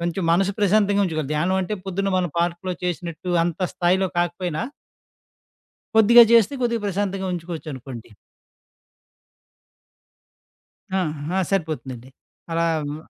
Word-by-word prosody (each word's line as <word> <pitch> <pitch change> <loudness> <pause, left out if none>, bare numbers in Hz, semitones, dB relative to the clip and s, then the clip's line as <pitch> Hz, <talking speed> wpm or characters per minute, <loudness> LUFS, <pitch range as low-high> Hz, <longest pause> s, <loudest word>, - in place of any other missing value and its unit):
కొంచెం 175 +2 -2
మనసు 195 +3 +2
ప్రశాంతంగా 205 0 +3
ఉంచుకోవాలి. 155 -5 -3
ధ్యానం 175 +5 +1
అంటే, 210 +4 -3
పొద్దున 195 +1 -2
మనం 180 -2 -1
పార్క్‌లో 175 +2 -1
చేసినట్టు, 175 -1 -4 0.2
అంత 175 +1 -3
స్థాయిలో 185 +2 +2
కాకపోయినా 175 0 -1 1.3
కొద్దిగా 230 +2 +8
జేస్తే 235 +2 +5
కొద్దిగా 235 -2 0
ప్రశాంతంగా 195 0 -2
ఉంచుకోవచ్చునుకోండి. 155 -8 -7 2.9
ఆ! 190 - +2
ఆహా! 155 +1 -2
సరిపోతుందండి. 150 -9 -3 0.4
అలా 165 0 +1 0.2
మ్ 150 - -5
175 Hz, 105 wpm, -22 LUFS, 160-195 Hz, 2.9 s, కొద్దిగా